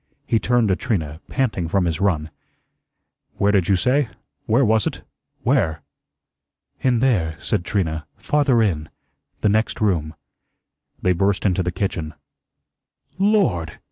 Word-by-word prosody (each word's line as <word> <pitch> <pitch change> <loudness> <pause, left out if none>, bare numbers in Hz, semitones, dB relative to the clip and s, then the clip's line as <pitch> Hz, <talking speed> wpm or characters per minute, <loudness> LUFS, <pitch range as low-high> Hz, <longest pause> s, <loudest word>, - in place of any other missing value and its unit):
He 115 - +2
turned 120 +1 +2
to 95 - +3
Trina, 80 - -3
panting 110 -11 -1
from 95 +2 +1
his 85 0 -1
run. 80 -6 0 1.0
"Where 100 +1 +2
did 95 -3 +2
you 100 - +5
say 125 +7 +2 0.4
where 120 +5 +4
was 110 -1 +2
it - - -5 0.4
where?" 80 -2 +1 1.0
"In 125 -3 +2
there," 95 -12 +2
said 85 - -1
Trina, 80 -6 -2
"farther 130 +1 +2
in 80 -7 -1 0.5
the 105 - +3
next 110 +2 +1
room." 85 -7 0 0.9
They 90 - +4
burst 95 +3 0
into 95 -1 +2
the 90 0 -1
kitchen. 85 -4 -3 1.0
"LORD!" 195 - +2
100 Hz, 135 wpm, -22 LUFS, 80-115 Hz, 1.0 s, you